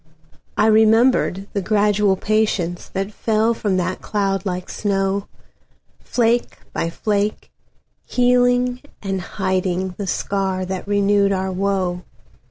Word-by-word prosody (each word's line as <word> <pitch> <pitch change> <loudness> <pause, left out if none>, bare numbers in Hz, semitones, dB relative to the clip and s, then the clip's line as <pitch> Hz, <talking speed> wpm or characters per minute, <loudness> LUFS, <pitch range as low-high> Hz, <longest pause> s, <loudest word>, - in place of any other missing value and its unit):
I 215 - +4
remembered 220 -2 +4
the 200 - -1
gradual 205 0 +2
patienceThat 195 -2 -1
fell 220 +1 +1
from 205 -4 -1
that 185 +1 -2
cloud 195 -2 -1
like 180 -1 -3
snow, 195 -1 -1 0.7
Flake 235 0 0 0.2
by 165 - -1
flake, 205 +3 -2 0.5
healing 245 0 +2 0.2
and 195 -1 -2
hidingThe 185 0 -2
scar 190 -2 -1
that 190 +1 -5
renewed 200 0 +3
our 190 0 -1
woe. 185 -2 -1
200 Hz, 105 wpm, -20 LUFS, 190-215 Hz, 0.7 s, I